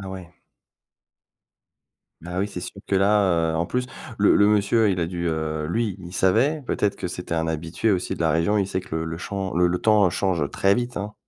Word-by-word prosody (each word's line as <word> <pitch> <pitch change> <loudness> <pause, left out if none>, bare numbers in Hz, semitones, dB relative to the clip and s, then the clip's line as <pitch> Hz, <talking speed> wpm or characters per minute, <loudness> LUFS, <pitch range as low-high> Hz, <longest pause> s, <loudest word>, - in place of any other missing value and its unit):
Ah 95 - -7
ouais. 95 -2 -8 2.0
Ah 90 +1 -4
oui, 100 - 0
c'est 90 -3 -7
sûr 100 - -8
que 100 - +1
là, 95 -4 +3
heu, - - -1
en 85 - 0
plus, 125 +7 -2 0.3
le 105 - +4
le 100 - +5
monsieur, 105 +1 +3
il 90 -2 0
a 85 - +1
dû 85 0 -3
heu, 80 -1 -2
lui, 105 0 -1
il 90 0 -10
savait, 120 - +2
peut-être 105 -4 0
que 95 - -4
c'était 90 -1 -4
un 80 0 -1
habitué 80 +7 -1
aussi 90 -2 -1
de - - -6
la 80 -2 +2
région. 85 +6 +2
Il 100 -2 +1
sait 95 - -2
que 95 - -7
le 80 - -1
le 80 0 -5
champs 95 0 -4
le 90 0 +4
le 90 - 0
temps 105 -4 +4
change 85 -6 -1
très 100 +6 +2
vite 120 +1 -2
hein. 105 +1 -5
95 Hz, 230 wpm, -23 LUFS, 85-105 Hz, 2.0 s, le